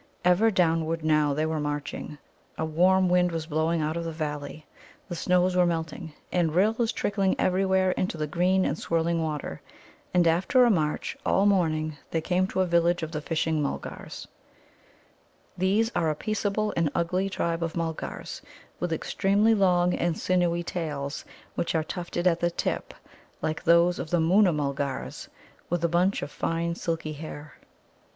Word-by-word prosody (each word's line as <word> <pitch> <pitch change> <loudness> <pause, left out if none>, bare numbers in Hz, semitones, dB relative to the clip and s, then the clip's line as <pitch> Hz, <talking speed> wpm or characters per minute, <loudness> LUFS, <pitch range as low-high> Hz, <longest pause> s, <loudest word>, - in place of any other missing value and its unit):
Ever 180 +5 +5
downward 165 -4 +1
now 150 -2 +3
they 155 +1 0
were 160 0 -1
marching. 150 0 -4 0.4
A 160 - -1
warm 185 +4 +3
wind 180 0 +3
was 165 -1 -3
blowing 160 +1 0
out 155 +1 -1
of 170 - -2
the 165 - -4
valley, 150 -1 -5 0.4
the 175 - -5
snows 180 +1 +2
were 180 -1 +4
melting, 165 0 -3 0.2
and 165 -3 +1
rills 220 +5 +2
trickling 200 -3 0
everywhere 190 0 +2
into 180 -2 -2
the 155 - -1
green 180 +4 +2
and 150 - -1
swirling 165 0 0
water. 150 - -4 0.5
And 180 -1 +3
after 185 - +4
a 240 - +4
march 155 -6 -1
all 195 - +2
morning, 155 -6 +1
they 165 - 0
came 180 +3 +1
to 190 - -1
a - - +3
village 170 0 +2
of 160 - -4
the 150 -2 -3
Fishing 160 0 0
mulgars. 140 - -5 1.3
These 200 +5 +1
are 165 - +2
a 155 - 0
peaceable 215 +3 -1
and 165 -3 +2
ugly 180 +3 0
tribe 170 -3 -2
of 165 -1 -2
Mulgars, 165 -2 -4 0.4
with 175 -1 -2
extremely 200 +6 +2
long 180 -3 +3
and 170 -1 0
sinewy 175 -2 +1
tails, 150 -5 -4 0.3
which 170 - -2
are 160 - +2
tufted 175 +1 -4
at 170 -2 +3
the 175 - +2
tip, 170 - -3 0.5
like 155 +1 -2
those 170 +1 +4
of - - -4
the 175 - +2
Moona 180 +4 +4
mulgars, 140 - -3 0.4
with 175 -1 -1
a - - +4
bunch 175 +4 +1
of 145 - -6
fine 165 +1 -1
silky 165 -2 -3
hair. 150 0 -8
170 Hz, 165 wpm, -27 LUFS, 155-185 Hz, 1.3 s, Ever